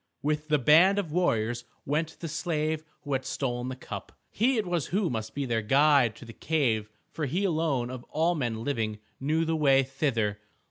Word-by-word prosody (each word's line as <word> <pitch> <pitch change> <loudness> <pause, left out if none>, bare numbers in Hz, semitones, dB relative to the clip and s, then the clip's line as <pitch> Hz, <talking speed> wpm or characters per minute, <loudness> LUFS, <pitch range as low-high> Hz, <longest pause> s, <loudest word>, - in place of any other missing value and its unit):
With 150 +1 -1
the 150 -1 +3
band 165 - +6
of 185 -7 -2
warriors 120 -9 +1 0.2
went 155 +3 -1
the 165 - -3
slave 155 -1 -1 0.2
who 145 - -4
had 130 0 0
stolen 125 -2 -2
the 130 - -4
cup. 130 - -8 0.2
He 245 +4 +2
it 215 - 0
was 175 -4 -1
who 190 -2 0
must 110 -2 -4
be 140 -1 -1
their 115 -3 0
guide 135 0 +4
to 120 - -12
the 115 - -10
cave, 120 -10 0 0.2
for 155 -3 -3
he 180 +9 -1
alone 155 -9 0
of 130 -1 -7
all 165 +3 +1
men 120 -8 -2
living 110 -6 -1 0.2
knew 155 +4 +1
the 165 0 0
way 135 -3 +4
thither. 125 -6 -1
145 Hz, 195 wpm, -28 LUFS, 120-160 Hz, 0.2 s, band